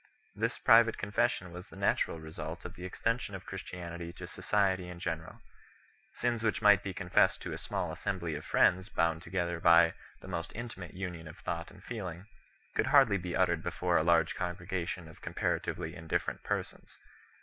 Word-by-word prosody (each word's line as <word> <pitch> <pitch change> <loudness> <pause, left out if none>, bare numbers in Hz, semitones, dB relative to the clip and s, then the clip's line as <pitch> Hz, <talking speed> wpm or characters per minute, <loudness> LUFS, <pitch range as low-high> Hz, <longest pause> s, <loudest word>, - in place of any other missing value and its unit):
This - - -1
private 115 0 +6
confession 105 -3 0
was 90 +1 -9
the - - -14
natural 80 - +1
result 80 +1 -7
of 90 - -6
the 90 -2 -8
extension 115 +2 -1
of 95 - -8
Christianity 85 -2 -6
to 90 - -8
society 95 0 +1
in 90 - -7
general. 80 -3 -4 0.7
Sins 120 -2 0
which 110 -2 +1
might 105 -2 +6
be 100 - -4
confessed 90 -1 +3
to - - -4
a - - -4
small - - -2
as - - -7
sembly 85 -5 -2
of 75 - -5
friends 95 +4 +3
bound 80 -1 +1
together 85 -1 -2
by 85 -1 +6 0.3
the - - -12
most 85 - -4
intimate 105 -8 -7
union 90 -3 -5
of 80 - -10
thought 85 0 -4
and 100 -2 -16
feeling 95 -6 -5 0.5
could - - +1
hardly 120 -9 +6
be 90 0 -4
uttered 85 -3 +2
before 85 +1 +1
a - - +3
large 85 0 +4
congregation 90 -1 -3
of 80 - -14
comparatively - - -2
indifferent 80 -1 -2
persons. - - -4
90 Hz, 175 wpm, -32 LUFS, 85-95 Hz, 0.7 s, private